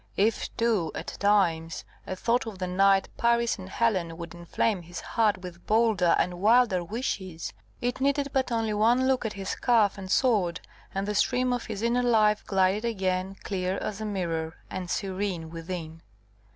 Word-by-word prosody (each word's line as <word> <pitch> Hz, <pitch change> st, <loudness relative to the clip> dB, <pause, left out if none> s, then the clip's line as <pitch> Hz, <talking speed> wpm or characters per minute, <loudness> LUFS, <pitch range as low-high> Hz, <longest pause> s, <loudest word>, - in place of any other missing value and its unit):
If 215 Hz, +3 st, +1 dB
too, 220 Hz, -9 st, +1 dB
at -, -, -5 dB
times, 175 Hz, -5 st, +2 dB, 0.2 s
a 185 Hz, -, -3 dB
thought 235 Hz, +5 st, 0 dB
of 215 Hz, -4 st, -6 dB
the 185 Hz, -, -2 dB
knight 195 Hz, +2 st, +3 dB
Paris 235 Hz, -1 st, +2 dB
and 185 Hz, 0 st, -8 dB
Helen 185 Hz, -7 st, 0 dB
would 170 Hz, 0 st, -7 dB
inflame 175 Hz, +4 st, -1 dB
his 175 Hz, +1 st, -8 dB
heart 220 Hz, -3 st, +1 dB
with 175 Hz, -1 st, -10 dB
bolder 215 Hz, -5 st, +3 dB
and 180 Hz, 0 st, -1 dB
wilder 220 Hz, -4 st, +4 dB
wishes, 190 Hz, -5 st, -4 dB, 0.3 s
it 245 Hz, +1 st, -2 dB
needed 280 Hz, +1 st, +1 dB
but 265 Hz, -2 st, +1 dB
one 225 Hz, +2 st, +2 dB
look 260 Hz, -3 st, +1 dB
at 215 Hz, -, -5 dB
his 195 Hz, -1 st, -5 dB
scarf 220 Hz, -5 st, +2 dB
and 190 Hz, -1 st, -7 dB
sword, 205 Hz, -8 st, +2 dB, 0.4 s
and 195 Hz, +1 st, -1 dB
the 210 Hz, -, -1 dB
stream 250 Hz, +4 st, +2 dB
of 245 Hz, -, -3 dB
his 215 Hz, -1 st, -5 dB
inner 240 Hz, +1 st, +2 dB
life 215 Hz, -3 st, +3 dB
glided 195 Hz, +2 st, +2 dB
again 190 Hz, -4 st, -1 dB
clear 185 Hz, 0 st, -2 dB
as 215 Hz, 0 st, -4 dB
a -, -, -3 dB
mirror, 165 Hz, -6 st, -2 dB, 0.2 s
and 185 Hz, -1 st, -4 dB
serene 190 Hz, -4 st, -2 dB
within. 165 Hz, -1 st, -6 dB
200 Hz, 170 wpm, -27 LUFS, 180-230 Hz, 0.4 s, wilder